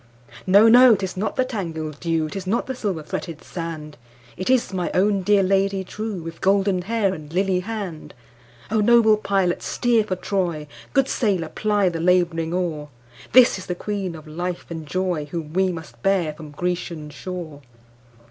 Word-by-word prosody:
No! 200 +4 +7
no! 245 0 +8
'tis 190 -2 -4
not 195 +4 -2
the 255 - +2
tangled 160 - -5
dew,'Tis 165 +3 -2
not 225 +5 0
the 265 - -4
silver 200 -10 -3
fretted 160 +1 -6
sand, 160 -4 -6 0.4
It 185 - -4
is 255 -6 +2
my 180 -2 -1
own 200 +1 +3
dear 200 +1 +3
Lady 195 0 +1
trueWith 180 -6 -6
golden 195 -1 +2
hair 205 0 0
and 155 -3 -9
lily 185 +1 +1
hand!O 155 - -6
noble 225 0 +5
pilot 195 -4 0
steer 235 -3 +1
for 190 -3 -2
Troy, 180 -5 -2 0.3
Good 270 -1 +3
sailor 190 -12 0
ply 205 0 +1
the 165 -1 -4
labouring 170 -2 +2
oar, 165 -5 -2 0.4
This 245 -5 +6
is 185 - -10
the 180 - -2
Queen 195 -2 -4
of 155 0 -11
life 175 +3 -4
and 160 -2 -6
joyWhom 165 -4 -3
we 190 +1 +2
must 165 -2 -9
bear 185 -6 +1
from 155 0 -10
Grecian 170 -1 -4
shore! 160 -1 -7
185 Hz, 160 wpm, -22 LUFS, 165-200 Hz, 0.4 s, no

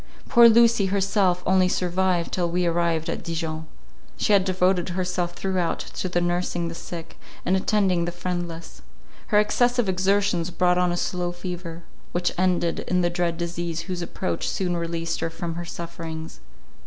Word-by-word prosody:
Poor 235 0 +8
Lucy 230 -3 +5
herself 190 -2 +1
only 185 0 +4
survived, 180 -1 0
till 175 -2 0
we 180 +1 0
arrived 170 -1 +1
at - - -3
Dijon. 160 -1 -4 0.5
She 210 - +2
had 195 -2 +5
devoted 185 -1 +1
herself 180 -1 -1
throughout 185 -2 -1
to 185 - -5
the 175 - +1
nursing 175 -1 -1
the - - -6
sick, 165 0 -8 0.3
and 185 - +3
attending 190 -3 +2
the 175 - -2
friendless. 175 - -5 0.5
Her 210 - +3
excessive 245 +2 +2
exertions 190 -2 +1
brought 180 0 +2
on 180 -1 +2
a 175 - -1
slow 175 0 -1
fever, 175 -1 -6 0.3
which 175 0 +1
ended 175 -2 +1
in 180 0 +2
the 175 0 +1
dread 175 -1 -1
disease 170 -1 -3
whose 180 0 -4
approach 90 - -3
soon 180 -2 -1
released 170 0 -2
her - - -1
from 165 +1 -5
her 175 +1 -5
sufferings. 165 -2 -7
175 Hz, 165 wpm, -24 LUFS, 170-185 Hz, 0.5 s, Poor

